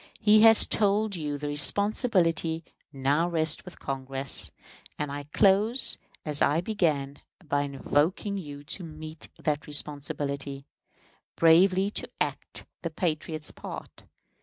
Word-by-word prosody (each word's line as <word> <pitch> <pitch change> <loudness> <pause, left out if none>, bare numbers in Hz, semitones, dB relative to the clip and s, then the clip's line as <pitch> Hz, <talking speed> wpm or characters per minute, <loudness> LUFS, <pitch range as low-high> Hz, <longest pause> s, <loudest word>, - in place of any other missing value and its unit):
He 215 -1 +5
has 225 0 +7
told 205 0 +1
you 150 -4 -3
the 145 +1 -5
responsibility 165 - +2 0.3
now 145 +5 +1
rests 160 -2 0
with 180 - -12
Congress; 135 0 0 0.5
and 150 -1 -3
I 145 0 -6
close 205 - +2 0.3
as 150 -2 +5
I 150 +3 +3
began, 155 -8 -1 0.3
by 145 0 +1
invoking 155 +8 -1
you 145 -4 -9
to 175 +5 -1
meet 155 -1 -10
that 150 -1 -2
responsibility, 140 -1 -2 0.7
bravely 185 +4 +4
to - - -3
act - - -3 0.2
the 170 - -3
patriot's 155 -2 -3
part. - - -10
155 Hz, 120 wpm, -27 LUFS, 145-190 Hz, 0.7 s, has